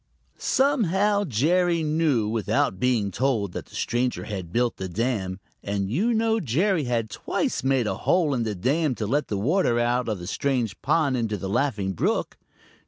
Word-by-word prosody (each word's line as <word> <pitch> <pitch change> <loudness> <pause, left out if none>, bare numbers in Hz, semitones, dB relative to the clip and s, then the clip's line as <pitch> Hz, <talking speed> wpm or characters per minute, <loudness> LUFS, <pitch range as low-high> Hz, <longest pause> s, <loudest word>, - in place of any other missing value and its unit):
Somehow, 210 - +2
Jerry 170 - +2
knew 150 -8 +1
without 105 -3 0
being 115 -5 +1
told 115 -4 0
that - - -7
the - - -14
stranger 125 +1 -1
had 95 -5 -6
built 120 +3 0
the 95 -1 -5
dam, 100 -2 -2 0.2
and 100 -1 -2
you 200 - +1
know 225 0 +2
Jerry 165 - +1
had 120 -2 0
twice - - -2
made 135 -2 +2
a - - -2
hole 170 -5 +2
in 125 - 0
the 110 -2 -2
dam 135 - +1
to 110 - -3
let 145 +8 0
the 100 - -2
water 125 - +2
out 120 +1 +1
of 105 - -1
the 90 - -8
strange 120 -1 -1
pond 145 -2 +2
into 110 -3 -1
the 95 - -5
Laughing 100 -5 0
Brook. - - -1
125 Hz, 175 wpm, -25 LUFS, 105-160 Hz, 0.2 s, Somehow